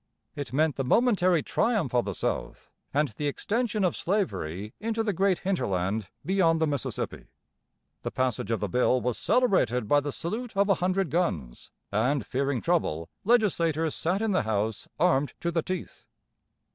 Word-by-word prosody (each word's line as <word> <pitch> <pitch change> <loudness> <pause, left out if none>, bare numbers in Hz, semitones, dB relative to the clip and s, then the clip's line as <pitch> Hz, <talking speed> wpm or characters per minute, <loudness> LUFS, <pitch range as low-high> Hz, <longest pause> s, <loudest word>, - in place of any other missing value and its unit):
It 145 -2 -5
meant 150 +2 +1
the 135 - 0
momentary 185 - +3
triumph 220 - 0
of 120 -1 +2
the 100 -3 -3
South - - -3 0.2
and 150 +1 +1
the 145 +7 -3
extension 215 - -1
of 180 - +2
slavery 105 - -2
into 225 +1 -1
the 210 -2 0
great 190 0 +2
hinterland 105 - -1 0.2
beyond 170 -3 +3
the 160 - +3
Mississippi. 145 -2 -3 0.8
The - - -3
passage 130 -4 -1
of 115 - 0
the 105 - 0
bill 125 +4 +2
was 125 0 -1
celebrated 130 - +2
by 145 - +5
the 145 0 -3
salute 220 - -4
of 200 +1 +3
a - - +7
hundred 185 -2 +1
guns; 85 - -2 0.2
and, 125 +5 +1
fearing 135 -2 -1
trouble, 120 - 0
legislators 170 -9 +2
sat 185 +6 0
in 220 - +1
the 185 - +2
House 110 -1 -1
armed 150 -4 +2
to 170 - -1
the 165 -1 +1
teeth. 185 +2 -6
160 Hz, 165 wpm, -27 LUFS, 125-195 Hz, 0.8 s, a